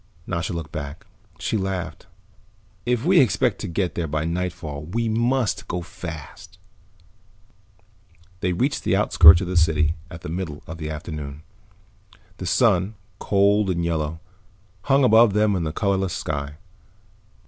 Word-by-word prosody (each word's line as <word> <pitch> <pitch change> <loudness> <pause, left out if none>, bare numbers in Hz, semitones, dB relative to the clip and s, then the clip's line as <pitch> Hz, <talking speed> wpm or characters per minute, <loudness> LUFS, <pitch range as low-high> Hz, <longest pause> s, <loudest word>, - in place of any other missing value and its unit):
Nasha 85 -1 -2
looked 85 -2 -5
back. 70 +1 -7 0.3
She 110 - -1
laughed. 95 -4 -4 0.8
"If 125 +1 0
we 180 0 +5
expect 125 -10 +2
to - - -4
get 90 +1 -1
there 85 -2 -2
by 75 +1 -2
nightfall 85 -3 -4
we 115 +8 -2
must 120 +2 0
go 90 -1 -3
fast." 85 -4 -9 1.8
They 90 0 0
reached 130 +11 -1
the - - +2
outskirts 80 +3 +7
of 95 - -3
the 90 - -3
city 80 -2 +3 0.2
at - - -12
about 80 - -11
the 75 - -7
middle 80 -3 -5
of 80 0 -8
the 75 -1 -4
afternoon. 75 -2 -6 0.9
The 90 - -5
sun, 100 0 +2 0.2
cold 100 0 +2
and 85 -2 0
yellow, 80 -1 -2 0.7
hung 140 0 +4
above 115 -3 +6
them 105 -1 +2
in 85 -3 -1
the 80 - -2
colorless 95 0 0
sky. 70 -1 -4
90 Hz, 150 wpm, -23 LUFS, 80-105 Hz, 1.8 s, outskirts